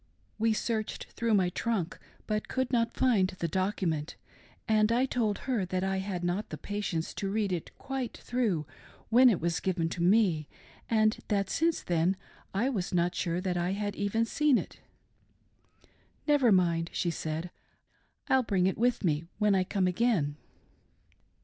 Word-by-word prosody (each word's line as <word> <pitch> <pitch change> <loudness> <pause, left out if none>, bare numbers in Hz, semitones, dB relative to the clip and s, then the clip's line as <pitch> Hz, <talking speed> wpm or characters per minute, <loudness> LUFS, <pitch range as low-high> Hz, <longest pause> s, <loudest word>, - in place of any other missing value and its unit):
We 225 +1 +3
searched 220 0 -2
through 230 -2 +1
my 185 -3 +3
trunk 190 -3 -2 0.3
but 215 -1 -2
could 260 -1 -1
not 230 -1 +2
find 225 -8 +3
the 170 - -1
document, 180 -4 -1 0.5
and 215 0 +3
I 245 +3 +3
told 225 -6 0
her 245 -7 0
that 185 +1 -2
I 190 0 0
had 190 -2 -3
not 175 +4 -1
patience 205 -6 -3
to 195 - -3
read 205 -1 0
it 175 -3 -3
quite 265 -3 -4
through 220 -11 -1 0.4
when 250 +3 +7
it 205 - +2
was 170 0 0
given 175 -3 0
to 170 - -4
me, 180 -5 +3 0.4
and 215 -1 +3
that 200 -2 0
since 330 0 +1
then 175 +2 +1 0.3
I 210 +6 +1
was 195 -9 -2
not 175 0 +2
sure 170 -1 -1
that 185 -2 -1
I 175 +2 0
had 205 0 -3
even 205 +3 0
seen 295 +2 +3
it. - - -6 0.7
" - - -35
Never, 285 -6 +4
mind," 170 -3 +2
she 170 - -1
said, 160 +2 -4 0.4
" - - -42
I'll 265 - +4
bring 195 -6 +1
it 190 - 0
with 240 -1 +2
me 155 -2 +1
when 210 -1 +3
I 190 -1 +3
come 185 +1 0
again." 180 -6 +1
195 Hz, 170 wpm, -30 LUFS, 175-230 Hz, 0.7 s, when